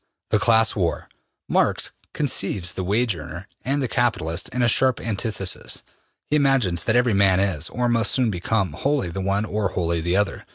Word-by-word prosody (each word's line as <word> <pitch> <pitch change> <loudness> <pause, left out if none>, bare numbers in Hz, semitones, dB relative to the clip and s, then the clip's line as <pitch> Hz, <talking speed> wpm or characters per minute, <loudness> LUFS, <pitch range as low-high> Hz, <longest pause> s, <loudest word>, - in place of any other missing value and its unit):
The 110 - +3
Class 110 +1 +4
War. 90 -5 -1 0.4
Marx - - +1 0.2
conceives 100 - -1
the 95 - -4
wage 105 +3 +1
earner 75 -2 -8
and 140 +2 -1
the - - 0
capitalist 110 -11 0
in 125 +1 -1
a - - +4
sharp 130 +2 +2
antithesis. 105 -4 -3 0.4
He 150 - -1
imagines 135 - +2
that 110 - +2
every 125 -2 +3
man 95 -2 +4
is, 85 -5 0
or 125 +2 -1
must 115 -3 +1
soon 125 -4 +2
become, 95 +2 -1
wholly 140 -11 -1
the 95 - -4
one 100 +2 0
or 105 -2 -1
wholly 85 -2 -1
the 85 +2 0
other. 105 0 -1
105 Hz, 180 wpm, -23 LUFS, 90-120 Hz, 0.4 s, Class